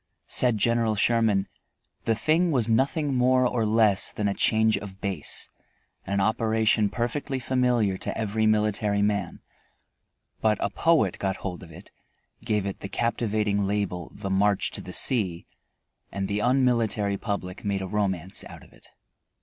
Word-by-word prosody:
Said 125 -3 +2
General 115 0 +1
Sherman: 110 -2 +2 0.6
"The 115 - +2
thing 160 +9 +2
was 125 -8 +2
nothing 135 +5 +1
more 130 0 +3
or 120 -2 -1
less 105 -2 +3
than 105 - -2
a 100 - 0
change 110 +1 +2
of 100 -1 -8
base; 95 -7 -1 0.6
an 100 0 0
operation 110 0 +1
perfectly 125 +5 -3
familiar 125 -6 0
to - - -3
every 110 0 0
military 105 -1 +1
man, 100 -4 -2 1.0
but 110 -1 +2
a - - -1
poet 160 - +1
got 95 -1 -1
hold 90 -2 -5
of 85 - -12
it, - - -14 0.5
gave 105 -4 -1
it 100 - -5
the 100 - -7
captivating 105 -3 -1
label, 100 -4 -3
'The 95 - -5
March 100 +1 +1
to - - -3
the - - -9
Sea,' 95 -10 +2 0.7
and 100 -1 -3
the 100 +1 -2
unmilitary 115 -5 +1
public 100 -4 -5
made 100 -1 -2
a - - -4
romance 95 -3 -1
out - - -12
of - - -19
it." - - -18
105 Hz, 155 wpm, -25 LUFS, 100-115 Hz, 1.0 s, more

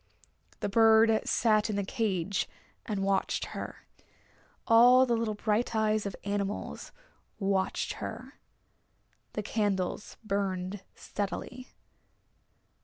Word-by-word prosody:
The - - 0
bird 225 +1 +5
sat 215 -2 +2
in 210 - -1
the 200 - 0
cage 195 -3 -1 0.4
and 205 -3 -2
watched 195 -1 0
her. - - -7 0.8
All 245 +3 +7
the 240 -2 +1
little 225 -2 -1
bright 220 +2 0
eyes 215 -1 +1
of 195 - -5
animals 200 0 -3 0.5
watched 195 -2 0
her. - - -7 0.9
The 210 - -3
candles 205 -3 -2
burned 195 -2 -2
steadily. 245 +5 -5
210 Hz, 105 wpm, -29 LUFS, 195-225 Hz, 0.9 s, All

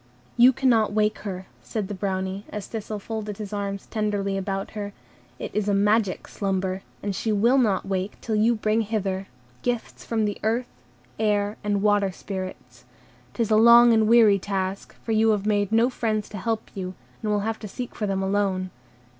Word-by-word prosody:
"You 245 +2 +7
cannot 235 -5 +2
wake 210 0 +1
her," 190 -3 -5 0.2
said 190 - -4
the 205 - -5
Brownie, 190 0 -2
as 210 -2 -5
Thistle 215 -1 -5
folded 210 -1 -5
his 210 -1 -6
arms 200 -1 -3
tenderly 205 -3 -1
about 195 0 -3
her. 205 -1 -5 0.4
"It - - -6
is 210 0 0
a 200 - +3
magic 205 -1 +2
slumber, 190 -1 -2 0.2
and 200 -2 -2
she 220 - -1
will 235 +6 +4
not 215 -6 +2
wake 195 +1 -3
till 225 - -4
you 225 +3 +3
shall 215 - -11
bring 215 +1 +3
hither 195 -3 -2 0.3
gifts 245 -2 -3
from 225 -2 0
the 205 - -3
Earth, 230 +3 0 0.5
Air, 210 -1 +1
and 205 -1 0
Water 205 -2 +3
Spirits. 185 0 -7 0.5
'T 235 - +1
is 220 - -3
a 215 - +6
long 235 +1 +8
and 220 -1 +4
weary 220 -3 +6
task, 190 0 -3
for 225 - -3
you 220 0 +4
have 210 -2 +1
made 205 -1 +1
no 225 +2 +4
friends 215 -4 -1
to 205 - -6
help 225 +1 -2
you, 185 -2 -5 0.3
and 215 - -2
will 210 -1 +1
have 220 +1 -2
to 215 - -7
seek 245 +5 -6
for 210 - -3
them 195 -1 -1
alone. 190 -2 0
210 Hz, 195 wpm, -25 LUFS, 195-220 Hz, 0.5 s, long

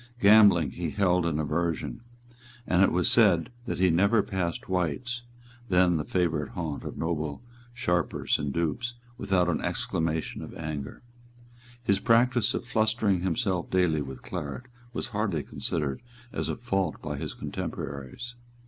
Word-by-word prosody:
Gambling 100 - +6
he 85 +3 -3
held 90 -2 +2
in 80 -3 0
aversion; 80 +6 -1 0.6
and 90 0 +3
it 95 - +5
was 90 0 +2
said 105 -1 +4 0.2
that - - -2
he 90 -1 +4
never 100 +5 +4
passed 90 -3 -3
White's, 95 - -1 0.5
then 90 -2 +4
the 75 - -1
favourite 80 -5 0
haunt 80 -5 -4
of - - -6
noble 80 +2 -2 0.3
sharpers 90 -8 0
and 75 -1 -2
dupes, 85 - -1 0.2
without 90 -2 +2
an 90 - 0
exclamation 80 -1 -2
of - - -8
anger. 75 - -5 0.8
His 100 -4 +2
practice 120 +1 +3
of - - -3
flustering 110 -5 +2
himself 95 -1 0
daily 90 -5 +2
with 65 -2 -7
claret 75 - -5 0.3
was 120 - -3
hardly 100 -9 -1
considered 75 +1 -2 0.3
as - - -2
a - - -1
fault 95 - -1
by - - -3
his - - -5
contemporaries. 70 - -5
90 Hz, 145 wpm, -28 LUFS, 80-105 Hz, 0.8 s, Gambling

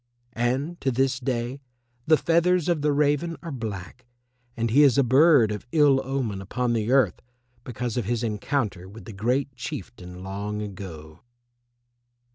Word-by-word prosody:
And 130 +8 -1
to 135 - +1
this 130 +1 +1
day 125 +1 -3 0.5
the 155 0 +6
feathers 170 +1 +2
of 170 -4 +1
the 150 0 +2
raven 150 +3 +1
are 165 - -6
black, 115 -1 -7 0.5
and 115 -1 -1
he 140 +5 +5
is 140 -3 +5
a 140 - +5
bird 130 -2 +5
of 105 +2 -6
ill 145 -4 +4
omen 125 -7 -3
upon 120 +5 -1
the 115 +1 -1
earth 130 -9 +3 0.4
because 125 -1 -4
of 120 - -1
his 120 +2 -1
encounter 105 -4 -2
with 110 +3 -12
the 110 - -9
Great 125 +6 -1
Chieftain 115 - -8
long 100 +2 -4
ago. 90 -7 -8
125 Hz, 155 wpm, -25 LUFS, 105-140 Hz, 0.5 s, the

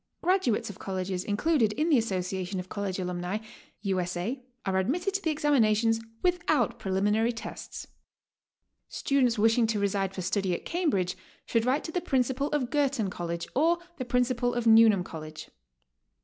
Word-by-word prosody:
Graduates 330 - +1
of 190 - -15
colleges 185 -1 -3
included 225 +1 +1
in 310 +9 0
the 295 - +5
Association 185 -3 -2
of 180 0 -7
College 200 -3 -3
Alumnae, 180 +2 -3 0.4
U. 195 -2 0
S. 180 0 -2
A., 240 +9 -3 0.2
are 190 -1 +1
admitted 350 - 0
to 395 - 0
the 325 - 0
examinations 230 -7 +3 0.2
without 315 -9 +1
preliminary 210 +3 +1
tests. 230 - -7 1.0
Students 255 -4 +1
wishing 225 +2 +4
to 220 -2 0
reside 195 -1 0
for 185 - -4
study 190 -1 0
at - - -8
Cambridge 275 - 0 0.3
should 230 -1 +1
write 270 +4 +2
to 320 - -5
the 360 - -1
Principal 265 -2 0
of 280 -5 -1
Girton 275 -9 +1
College, 170 -1 -4
or 330 +5 +3 0.2
the 255 - -4
Principal 245 0 +1
of 240 -1 -1
Newnham 220 -4 +6
College. 155 -2 -9
225 Hz, 160 wpm, -28 LUFS, 190-270 Hz, 1.0 s, Newnham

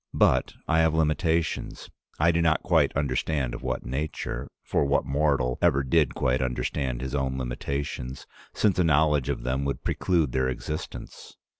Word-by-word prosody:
But - - +3
I 80 -1 +3
have 80 -1 +3
limitations, 80 +1 0 0.3
I 80 +3 +4
do 85 0 +1
not 80 -1 +2
quite - - +3
understand 70 -1 -1
of - - -6
what - - -3
nature 65 -1 -3
— - - -63
for - - +3
what 70 0 +1
mortal 70 -3 +1
ever 70 -6 +3
did 70 +1 +2
quite 65 +1 +1
understand 65 0 -2
his 65 0 -4
own 65 -2 -1
limitations, 65 +1 -4 0.3
since 100 -4 +1
a - - +5
knowledge 75 -4 +3
of - - -2
them 65 +2 -1
would 70 - -3
preclude 85 -7 +1
their 65 +1 +1
existence? 75 +4 -6
70 Hz, 165 wpm, -26 LUFS, 65-80 Hz, 0.3 s, a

